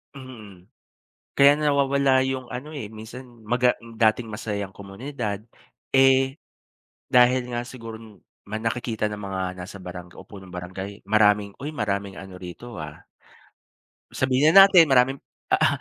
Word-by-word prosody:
Mm, 110 -8 -12 0.7
kaya 140 +1 +7
nawawala 140 -2 +2 0.2
yung 130 -1 -3
ano, 130 +5 -6
eh. 110 -6 -6
Minsan 110 +4 -10 0.2
maga 125 +2 +3
dating 115 0 0
masayang 105 -3 -5
komunidad. 105 +1 -5 0.6
Eh, 135 +1 +4 0.8
dahil 125 0 +4
nga 120 0 -3
siguron 115 -3 -11 0.3
ma 110 - -4
nakikita 115 -1 -2
ng 105 - -6
mga 95 -1 -4 0.2
nasa 100 +2 -8
barang 90 -1 -10
o - - -11
punong 95 -3 -12
barangay 95 +3 -8
maraming 105 -1 +3
"Uy 145 - -4
maraming 100 -3 -3
ano 95 -1 -10
rito, 105 +7 -9
ah." 75 -1 -10 1.1
Sabihin 130 +4 +3
na 195 - +12
natin, 175 -5 +6
maraming 135 0 +3 0.3
a - - +6
a - - +5
115 Hz, 135 wpm, -24 LUFS, 100-130 Hz, 1.1 s, na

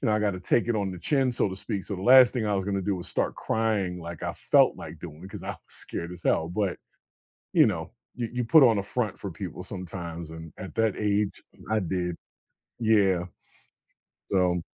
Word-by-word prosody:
you 130 - 0
know, 110 - +3
I 105 - +3
gotta 100 -3 0
take 115 +6 +2
it 120 - +2
on 100 -2 -1
the 90 - -7
chin, 135 - +2
so 120 - +1
to 95 - -5
speak, 95 0 -4
so, 100 - -4
the 95 - -6
last 125 +2 +8
thing 115 -5 -1
I 105 - +1
was 95 -1 0
gonna 100 -1 -1
do 100 0 0
was 90 - -7
start - - -1
crying 105 -6 -1
like 85 0 -8
I - - -2
felt - - +3
like 85 - -9
doing 80 -2 -9
because 95 +2 -9
I - - -7
was - - -8
scared 85 +1 -3
as 90 -1 -9
hell, 80 - +2
but, 95 +1 -1 0.8
you - - +6
know, - - -3 0.2
you 120 -2 -3
you 125 - 0
put 135 +5 +7
on 115 -4 +5
a 100 - -2
front 115 +1 -2
for 100 - -4
people 90 +1 -6
sometimes, 85 -3 -6
and 80 -1 -9
at 95 - -8
that 110 -2 +2
age, 105 -1 0 0.3
I 110 - +3
did. 90 -2 -2 0.6
Yeah, 100 -6 +3 1.1
so 90 -2 +2
95 Hz, 220 wpm, -27 LUFS, 90-110 Hz, 1.1 s, last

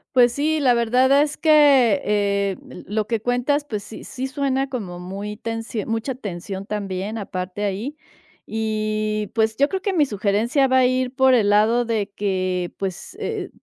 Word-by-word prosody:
Pues, 245 -1 +6
sí, 310 +3 0
la 260 -4 +4
verdad 250 +4 +4
es 295 0 -1
que, 285 - +5
eh, 200 -2 0
l - - -10
lo 215 +1 -1
que 230 +1 -1
cuentas, 245 +5 0
pues, 210 -7 -4
sí 220 - -10
sí 260 0 -5
suena 270 0 -1
como 205 -10 -5
muy 200 +4 -6
tensio 225 -1 -4
mucha 225 +4 -2
tensión 195 -3 -6
también 200 0 -4
aparte 190 -1 -5
ahí. 215 +10 -3 0.5
Y, 215 -1 -1
pues, 220 -1 +1
yo 280 - +4
creo 380 +4 -3
que 395 -1 -1
mi 310 -5 +3
sugerencia 220 +5 +1
va 260 0 +3
a 255 - +5
ir 255 0 0
por 265 -1 +4
el 220 -5 +3
lado 215 +4 +4
de 220 -3 -1
que, 185 -3 -1
pues, 190 -2 -5
eh - - -3
225 Hz, 175 wpm, -22 LUFS, 205-260 Hz, 0.5 s, Pues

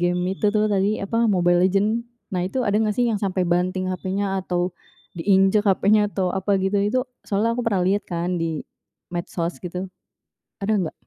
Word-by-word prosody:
game, 175 0 +1
itu, 210 - +1
tuh, 215 0 +2
tadi, 200 +2 +1
apa, 230 +3 +1
Mobile 175 -2 +3
Legends. 210 +4 +1 0.3
Nah, 180 -1 0
itu 255 +5 -1
ada 205 - +1
nggak 215 -1 +1
sih 245 -1 +3
yang 210 - 0
sampai 190 -2 0
banting 185 +2 0
HP-nya 195 +1 -2
atau 180 -1 -1 0.5
diinjek 195 +4 +3
HP-nya 205 +2 +4
atau 185 -3 -1
apa, 195 +1 +1
gitu, 195 +2 +1
itu 210 +6 +1 0.3
soalnya 215 +3 +1
aku 245 - -2
pernah 200 -5 +2
lihat, 200 +2 +2
kan, 175 0 -1
di 165 -2 -2 0.5
medsos, 175 0 -3
gitu, 180 +1 -5 0.7
ada 200 +2 0 0.2
gak? - - -36
195 Hz, 180 wpm, -23 LUFS, 180-210 Hz, 0.7 s, HP-nya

